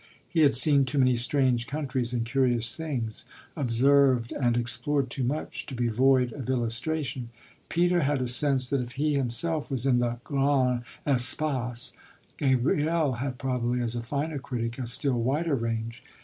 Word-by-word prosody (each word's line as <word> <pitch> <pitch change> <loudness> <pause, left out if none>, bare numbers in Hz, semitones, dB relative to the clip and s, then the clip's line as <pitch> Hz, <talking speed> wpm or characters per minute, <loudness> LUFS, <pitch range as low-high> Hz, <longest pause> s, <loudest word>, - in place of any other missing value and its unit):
He 170 - -2
had 145 -5 +5
seen 140 +2 +4
too 145 +3 -4
many 130 -2 +4
strange 125 -1 +1
countries 135 -5 -2
and 120 -2 -1
curious 120 -2 +1
things, 125 -10 -4 0.3
observed 130 -2 +3
and 120 -3 0
explored 130 +2 -1
too 130 - -3
much, 140 +5 -3
to 135 - -6
be 120 -1 0
void 125 +1 +2
of 130 -3 -7
illustration. 125 +1 -2 0.4
Peter 175 +1 +2
had 145 -1 +1
a 130 - -1
sense 130 +1 +4
that 140 -2 +1
if 120 -1 -6
he 150 +2 0
himself 145 +4 -1
was 130 -2 -1
in 125 -3 +3
the 120 0 -1
grandes 135 -3 +1 0.2
espaces 125 -2 +1 0.4
Gabriel 145 +3 +1
had 130 -2 -3
probably, 125 -2 -1
as 120 -1 -2
a 120 - -2
finer 145 +5 -3
critic, 120 -3 -4
a 125 - -3
still 125 0 0
wider 145 +6 0
range. 115 -1 -3
130 Hz, 165 wpm, -27 LUFS, 120-140 Hz, 0.4 s, had